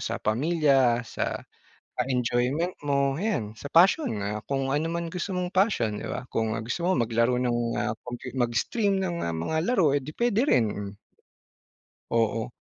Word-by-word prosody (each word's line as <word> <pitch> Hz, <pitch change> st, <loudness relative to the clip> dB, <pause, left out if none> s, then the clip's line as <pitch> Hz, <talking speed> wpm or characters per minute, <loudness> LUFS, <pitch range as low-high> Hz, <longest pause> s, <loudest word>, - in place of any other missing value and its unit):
sa -, -, -2 dB
pamilya, 135 Hz, -1 st, +3 dB
sa -, -, -3 dB, 0.6 s
ah, 125 Hz, -, +2 dB
enjoyment 125 Hz, +7 st, +1 dB, 0.2 s
mo 140 Hz, -1 st, +2 dB
'yan, 195 Hz, -, -1 dB
sa 140 Hz, -, -7 dB
passion, 185 Hz, -, +4 dB
ah, 105 Hz, +1 st, -2 dB
kung 135 Hz, -1 st, 0 dB
ano 155 Hz, +3 st, 0 dB
man 170 Hz, 0 st, -2 dB
gusto 185 Hz, +2 st, -3 dB
mong 180 Hz, 0 st, -2 dB
passion, 155 Hz, -, +1 dB
'di -, -, -5 dB
ba, 125 Hz, -, -4 dB
kung 110 Hz, -1 st, 0 dB
gusto 125 Hz, +9 st, -3 dB
mo 185 Hz, -, +2 dB
maglaro 115 Hz, +2 st, +1 dB
ng 120 Hz, -1 st, 0 dB, 0.2 s
ah, 105 Hz, -, 0 dB
com 125 Hz, 0 st, -6 dB, 0.2 s
mag-stream 195 Hz, -, +1 dB
ng, 175 Hz, -2 st, -2 dB
ah, 85 Hz, -, -2 dB
mga 120 Hz, -, -2 dB
laro 190 Hz, -, +3 dB
eh, 145 Hz, -, +3 dB
di 150 Hz, -, -7 dB
puwede 235 Hz, -2 st, +2 dB
rin, 115 Hz, -, +4 dB
mm. 100 Hz, 0 st, -6 dB, 1.1 s
Oo. 115 Hz, 0 st, 0 dB
135 Hz, 170 wpm, -26 LUFS, 115-170 Hz, 1.1 s, passion